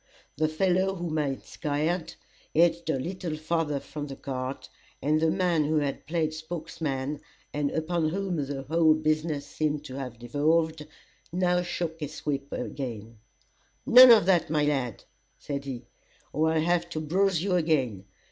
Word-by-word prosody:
The 155 +2 +1
fellow 185 +4 +1
whom 170 -3 -2
I 150 - +1
had 135 -1 -4
scared, 155 +4 -2 0.4
edged 170 +1 +3
a 155 - +2
little 170 +2 -4
farther 155 -2 -1
from 145 +2 -7
the 135 - -7
cart, 130 0 -5 0.3
and 155 +3 +1
the 160 - +3
man 175 -3 +2
who 155 +2 0
had 145 -2 -1
played 160 -1 0
spokesman, 155 -3 -4 0.3
and 145 -1 0
upon 160 +1 0
whom 190 0 -2
the 140 -2 -3
whole 160 +2 +4
business 155 -1 0
seemed 150 -1 -2
to 130 -2 -7
have 125 -3 -6
devolved, 150 +5 0 0.4
now 180 0 +2
shook 170 -2 -3
his 150 0 -6
whip 140 -1 -2
again 115 -4 -5 0.7
"None 255 -1 +10
of 225 -6 +8
that, 180 -5 +3
my 150 -1 +2
lad," 135 -6 -1 0.3
said 140 -1 -5
he, 130 -3 -6 0.5
"or 160 +2 +2
I'll 160 -1 +2
have 170 +1 +1
to 155 - -3
bruise 180 +2 +1
you 195 -1 0
again. 135 - +1
155 Hz, 160 wpm, -27 LUFS, 145-170 Hz, 0.7 s, None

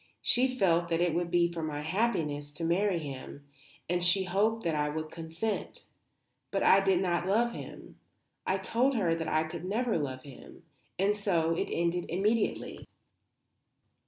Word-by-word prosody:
She 250 +2 +4
felt 175 -9 +1
that 165 -1 +1
it 175 -2 +2
would 170 +1 -1
be 170 0 +2
for 165 - -4
my 150 -2 -3
happiness 155 -6 -1
to 165 - -5
marry 180 +3 +2
him, 140 -2 -7 0.4
and 175 +1 0
she 180 +2 +4
hoped 210 +5 +1
that 165 - 0
I 150 -1 0
would 155 +1 -4
consent. 165 +6 -4 0.7
But - - -1
I 195 - +7
did 195 -2 +2
not 175 -1 0
love 230 +5 +2
him. - - -10 0.4
I 190 - 0
told 240 +8 +1
her 180 -7 +2
that 165 -1 -3
I 155 - +2
could 160 +2 -7
never 220 +2 0
love 130 -3 -4
him; 140 -3 -13 0.3
and 200 +2 +2
so 170 -5 +1
it - - -2
ended 170 +1 0
immediately. 205 +6 -1
175 Hz, 165 wpm, -30 LUFS, 160-200 Hz, 0.7 s, I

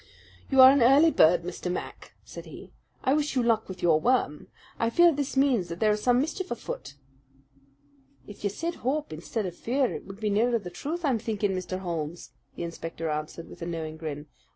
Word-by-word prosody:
"You 270 -1 +6
are 260 0 +11
an 280 -1 +3
early 280 +7 +6
bird, 170 - +4
Mr. 180 0 -4
Mac," 180 - -6
said - - -10
he. - - -11 0.3
"I 265 - +3
wish 295 -1 0
you 250 - +2
luck 225 -3 +1
with 185 -1 -8
your 165 -3 +4
worm. 165 - 0 0.3
I 230 - +2
fear 345 +8 +5
this 280 -1 -3
means 260 -9 +3
that 170 0 -6
there 215 -1 +3
is 210 0 -1
some 245 +2 +3
mischief 320 +7 -2
afoot." 140 - -6 1.3
"If 205 - -12
you 205 - +1
said 330 - -3
'hope' 285 - -1
instead 195 +7 -4
of 175 -2 -5
'fear,' 255 +6 0
it - - -8
would 195 +1 -10
be 215 -1 -1
nearer 235 +4 +2
the 185 -5 -8
truth, 315 - -4
I'm 255 -5 +2
thinking, 210 -2 -1
Mr. 185 0 -3
Holmes," 170 -2 -5 0.2
the - - -5
inspector 165 -1 -5
answered, 155 +2 -5
with - - -13
a 170 - -4
knowing 160 -2 -5
grin. 150 -2 -6
210 Hz, 205 wpm, -27 LUFS, 170-260 Hz, 1.3 s, are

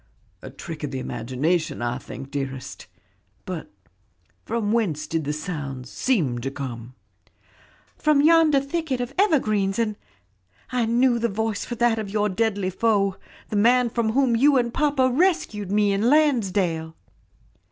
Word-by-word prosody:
"A - - -8
trick 160 -3 -8
of 145 - -2
the 135 - -5
imagination, 130 +8 -2
I 120 0 -2
think, 135 0 -9
dearest; 135 -2 -5 0.6
but 180 -4 -6 0.7
from 220 -2 -2
whence 195 -10 0
did 160 -2 -2
the 145 - -1
sounds 145 -6 -5
seem 160 - 0
to 135 - -2
come?" 125 -3 -7 1.0
"From 300 -2 +3
yonder 320 -2 +5
thicket 280 -2 -2
of 245 +2 -4
evergreens 215 - +2
and 220 -2 0 0.8
I 245 -3 0
knew 240 +1 +3
the 235 0 0
voice 220 0 -2
for 240 - -5
that 235 -1 +2
of 210 -2 -4
your 210 +1 0
deadly 200 -2 0
foe, 200 -2 +1 0.3
the - - -3
man 240 +3 +4
from 225 -2 0
whom 260 -2 +3
you 275 +4 +4
and 240 -1 0
papa 285 -3 +2
rescued 255 - 0
me 205 -1 +3
in 210 +5 +2
Landsdale." 195 - +1
210 Hz, 150 wpm, -24 LUFS, 160-245 Hz, 1.0 s, yonder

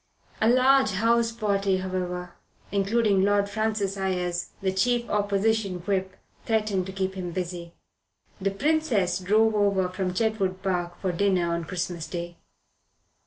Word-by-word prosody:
A 220 - +4
large 260 -1 +4
houseparty, 215 -3 +1
however, 180 -1 -4 0.4
including 200 0 +2
Lord 200 +1 +3
Francis 215 -2 -1
Ayres, 180 -2 -2
the 190 -1 0
chief 235 +5 +1
Opposition 205 -2 0
Whip, 190 0 -2 0.3
threatened 210 -4 0
to - - -5
keep 190 0 -2
him 185 -2 -5
busy. 175 -1 -5 0.7
The 195 - +1
Princess 215 - +1
drove 215 +4 +3
over 200 -3 +2
from 185 0 -3
Chetwood 195 -4 0
Park 175 -2 -2
for 190 - -1
dinner 180 -2 +1
on 170 -1 -2
Christmas 175 -1 -4
Day. 175 -1 -6
195 Hz, 130 wpm, -26 LUFS, 180-215 Hz, 0.7 s, A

